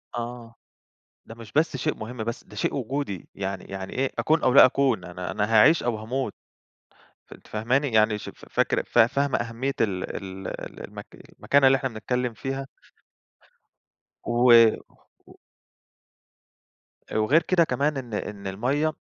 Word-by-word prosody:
آه، 120 -1 -6 0.7
ده 115 - -11
مش 115 -2 -12
بس 155 +3 +1
شيء 155 - -1
مهم، 120 +3 -8
بس 115 +1 -5
ده - - -15
شيء - - -1
وجودي، 130 - -4
يعني 95 -1 -4
يعني 95 -1 -7
إيه، 135 +1 -1
أكون 160 +1 +2
أو 125 - +3
لا - - +9
أكون، 130 -6 +1
أنا 90 +1 -6
أنا 105 -1 0
هاعيش 155 +10 +6
أو 120 -3 -1
هاموت، 115 +1 -3 1.0
أنتِ - - -14
فاهماني؟ 125 +7 0
يعني 110 -1 +3
ش - - -9
ف - - -12
فاكرة - - +1
فا 115 -1 +5
فاهمة 140 +2 0
أهمية 120 +4 -3
ال 95 -4 0
ال 95 -1 -8
ال - - -8
المك - - -10 0.3
المكانة 140 -1 +3
اللي 135 0 +6
إحنا 135 -1 -2
بنتكلم 125 +2 -2
فيها؟ 135 +3 -4 1.6
و 120 - -3 1.0
و - - -16 1.8
وغير 130 +10 +3
كده 170 0 +3
كمان، 140 +1 0
إن 120 -4 -7
إن 100 -1 -5
المَيَّة 135 +11 0
120 Hz, 150 wpm, -25 LUFS, 105-135 Hz, 1.8 s, لا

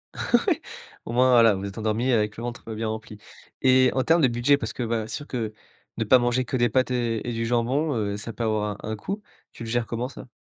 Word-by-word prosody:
Ouais. - - +1 0.4
Au - - -5
moins 125 +2 +4
voilà 115 -4 +6
vous 95 - -5
vous 100 - -4
êtes 100 - -9
endormis 110 +4 0
avec 105 -2 +1
le 115 - -6
ventre 120 -1 -6
bien 110 +1 -2
rempli. 110 -1 -6 0.5
Et 130 0 +6
en 130 - +1
termes 165 +3 +4
de 135 - +6
budget, 120 +4 +3
parce - - -4
que 125 - -3
voilà 115 -2 -1
c'est - - -4
sûr 145 - -10
que 115 -4 -3 0.4
de 115 - 0
pas 130 +4 +6
manger 120 +1 +1
que 120 - -3
des 120 -1 +3
pâtes 130 +3 +1
et 120 -2 -1
et 120 - -2
du 115 0 -2
jambon, 130 +5 +1
heu, 100 -2 -1
ça 105 +2 -6
peut 115 - -5
avoir 105 -2 -1
un - - -4
un - - -2
coût, 200 - -5 0.3
tu - - -9
le 115 - -6
gères 120 0 0
comment 120 +2 -3
ça? - - -11
120 Hz, 265 wpm, -25 LUFS, 110-130 Hz, 0.5 s, voilà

